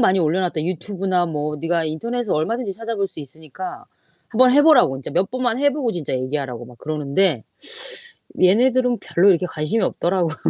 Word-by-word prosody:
많이 195 -5 +4
올려놨다." 170 -1 0
유튜브나 185 0 -1
뭐 150 -1 -3
네가 165 +1 0
인터넷에서 230 +8 -2
얼마든지 215 +7 -1
찾아 225 +2 -5
볼 200 -1 0
수 185 - -10
있으니까 160 - -9 0.4
한번 250 +2 +4
해 290 +2 +6
보라고 300 - +5
인제 130 - -8
몇 190 +3 0
번만 245 -2 -1
해 285 0 +4
보고 260 -5 -1
진짜 165 -7 -4
얘기하라고 130 -2 -3
막 125 0 -14
그러는데. 150 - 0 1.0
얘네들은 245 +6 +4
별로 185 +4 +3
이렇게 180 -1 +3
관심이 160 +8 -1
없더라고요. 175 -3 0
185 Hz, 420 characters per minute, -21 LUFS, 155-230 Hz, 1.0 s, 해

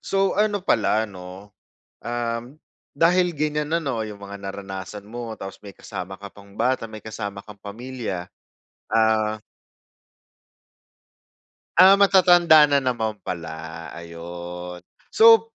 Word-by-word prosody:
So, 195 0 +1
ano 205 -2 0
pala 110 - +2
'no, 95 0 -11 0.5
uhm, 120 +3 -3 0.3
dahil 180 +1 +3
ganiyan 150 0 -2
na 170 - +2
'no, 125 -7 -2
yung 105 -1 -9
mga 100 0 -8
naranasan 100 0 -7
mo, 120 0 -6
tapos 95 0 -7
may 100 - -9
kasama 95 +1 -8
ka 100 - -8
pang 100 0 -17
bata, 125 +3 0
may 110 -1 -8
kasama 105 -2 -6
kang 105 0 -13
pamilya. 110 -4 -6 0.6
Ah 110 -1 +1 2.4
Ah, 190 +1 +9
matatanda 175 -5 +6
na 140 -1 +3
naman 120 -4 -1
pala, 80 -1 -6
ayon. 85 +1 -8 0.3
So, 225 0 +6
110 Hz, 120 wpm, -23 LUFS, 95-150 Hz, 2.4 s, Ah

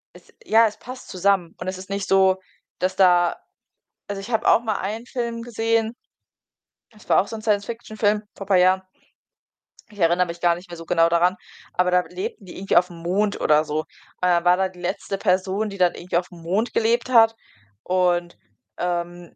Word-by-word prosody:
es - - -17
ja, 225 +1 +5
es 210 - -7
passt 255 +1 -10
zusammen. 185 -2 +1
Und - - -6
es 185 0 -3
ist 185 +1 -11
nicht 195 -1 -3
so, 190 -1 +4 0.4
dass 185 +1 -1
da 175 -2 +4 0.7
also, 200 -1 -4
ich 205 - -9
habe 225 +1 0
auch - - +5
mal 215 -3 -1
einen 220 +5 -4
Film 235 -2 -4
gesehen, 225 0 0 1.0
das 215 -2 -20
war - - +5
auch 195 - -2
so - - -7
'n 215 - -9
Science 205 -2 +1
Fiction-Film, 215 -2 -1
vor 195 - -8
paar 190 -2 +4
Jahren. 185 +1 +4 1.1
Ich 205 - -15
erinnere 175 +2 +3
mich 170 0 -8
gar 170 -1 +3
nicht 175 +1 -12
mehr 170 - -8
so 165 - -10
genau 165 0 +3
daran, 175 +2 +2 0.4
aber 180 0 +1
da 180 0 +4
lebten 385 - -6
die 180 - -11
irgendwie 195 -2 +1
aufm 175 -1 +2
Mond 200 +4 0
oder 150 0 +3
so. 150 0 -2
Und - - -4 0.4
da 175 -1 +3
war 180 +1 +4
dann 190 -1 0
die 180 -1 -15
letzte 195 +2 -3
Person, 190 +2 0
die 200 - -8
dann 180 -1 +3
irgendwie 175 0 -3
aufm 175 -1 -5
Mond 195 +8 -1
gelebt 235 +2 +1
hat. 225 -2 +5 0.5
Und, 175 -1 0 0.4
ähm, 175 0 -4
190 Hz, 200 wpm, -23 LUFS, 175-215 Hz, 1.1 s, ja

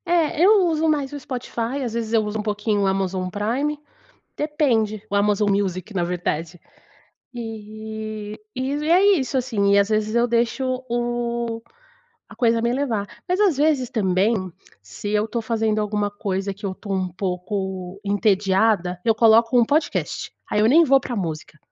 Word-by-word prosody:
É, 335 -2 +2
eu 400 -1 +6
uso 320 -1 +1
mais 285 -3 0
o 290 - -5
Spotify, 255 0 -4
às 235 -3 -3
vezes, 230 -1 -3
eu 225 -1 +4
uso 210 +1 -3
um - - 0
pouquinho 210 0 0
o 195 - +2
Amazon 190 -1 -1
Prime, 250 +10 -1 0.6
depende. 240 -9 0
O - - -3
Amazon 205 0 +2
Music, 195 0 -1
na 175 -2 +1
verdade, 175 -1 -3 0.8
e 215 -2 -7 0.2
e 260 +2 -2 0.2
é 365 +4 +5
isso, 265 -1 -1
assim, 215 -6 +1
e - - +5
às 200 +1 +2
vezes 215 0 0
eu 235 +1 +3
deixo 255 +2 0
o 235 -1 -2 0.7
a - - -14
coisa 230 -1 +2
me 235 +1 +1
levar. 235 -7 -1 0.2
Mas 365 +2 +1
às 400 -7 +4
vezes 285 -3 +2
também, 195 -3 +1 0.3
se 100 - -7
eu 210 +1 +1
tô 235 +1 -3
fazendo 220 -1 0
alguma 210 -1 -1
coisa 200 -1 -3
que 205 - -8
eu 190 - -2
tô 200 +2 -8
um 190 -1 0
pouco 185 +1 -4
entediada, 200 -2 +2
eu 225 - +4
coloco 230 +2 +5
um - - +6
podcast. 300 +5 -1 0.2
Aí 210 - +1
eu 210 - +4
nem 315 +8 +6
vou 275 -3 +5
para 245 -2 -5
música, 160 -6 -5
220 Hz, 170 wpm, -22 LUFS, 200-245 Hz, 0.8 s, eu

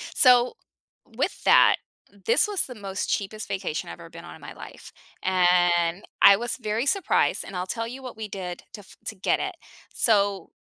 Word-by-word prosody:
So, 250 -1 +5 0.5
with - - -4
that, - - +6 0.5
this 460 -1 +3
was 410 -2 0
the 250 - -8
most 195 -2 -5
cheapest 215 +2 -3
vacation 190 -5 -4
I've 85 - -9
ever - - -12
been - - -12
on - - -10
in - - -17
my - - -9
life, - - -12 0.3
and 175 -1 +2 0.2
I 200 - +9
was 240 +2 -3
very 220 +3 -1
surprised, 390 +6 +1
and 195 - -9
I'll 180 0 -2
tell 230 +2 -3
you 265 +3 -9
what 255 -3 -9
we 220 -1 -5
did 185 -3 -7
to 220 - -9
f 195 - -18
to 220 - -5
get 190 - 0
it. 380 -1 -4 0.4
So, 200 -3 +1
205 Hz, 190 wpm, -25 LUFS, 185-240 Hz, 0.5 s, I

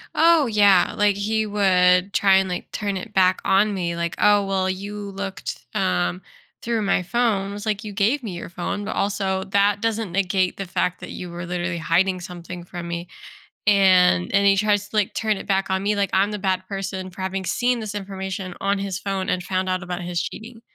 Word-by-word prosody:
Oh, 330 -3 +5
yeah, 205 -4 +4
like, 205 -1 +3
he 215 +2 0
would 185 -2 +3
try 195 -1 +4
and, 190 0 +2
like, 180 - -5
turn 200 -2 -2
it 215 +3 -8
back 185 -1 +3
on 205 +2 +3
me, 175 -3 -2
like, 170 0 -2
"Oh, 205 -1 +4
well, 190 -1 0
you 200 +2 -5
looked, 195 0 -6
um, 90 0 0 0.4
through 230 -2 0
my 195 -2 +1
phone." 200 -1 0
I - - -6
was, 205 +1 -7
like, 215 0 -1
"You 210 -1 -7
gave 225 +8 +1
me 210 - -4
your 175 - -7
phone, 175 +4 -4
but - - -4
also 195 -1 -1
that 200 +1 +2
doesn't 225 -3 -1
negate 185 0 0
the 195 - -4
fact 180 0 -1
that - - -8
you 180 - -7
were 170 0 -6
literally 175 0 -2
hiding 180 +3 +1
something 175 -1 -8
from 175 -1 -7
me." 170 +1 -4 0.6
And 185 - +4
and 200 0 +4
he 195 0 +5
tries 205 0 +1
to, 215 - -7
like, 210 -2 +1
turn 215 -1 0
it - - -8
back 195 -1 0
on 190 0 0
me, 205 +1 +1
like, 200 -2 0
I'm 195 +2 +3
the 210 - -3
bad 190 -2 -1
person 190 -1 -5
for 185 - -12
having 190 0 -3
seen 245 +5 0
this 215 -1 -5
information 190 -2 -5
on 200 0 +1
his 195 -2 -3
phone 195 -2 -3
and 180 - 0
found 185 0 -2
out 185 0 -1
about 175 0 -5
his 175 -1 -2
cheating. 225 +1 -7
195 Hz, 215 wpm, -23 LUFS, 180-205 Hz, 0.6 s, Oh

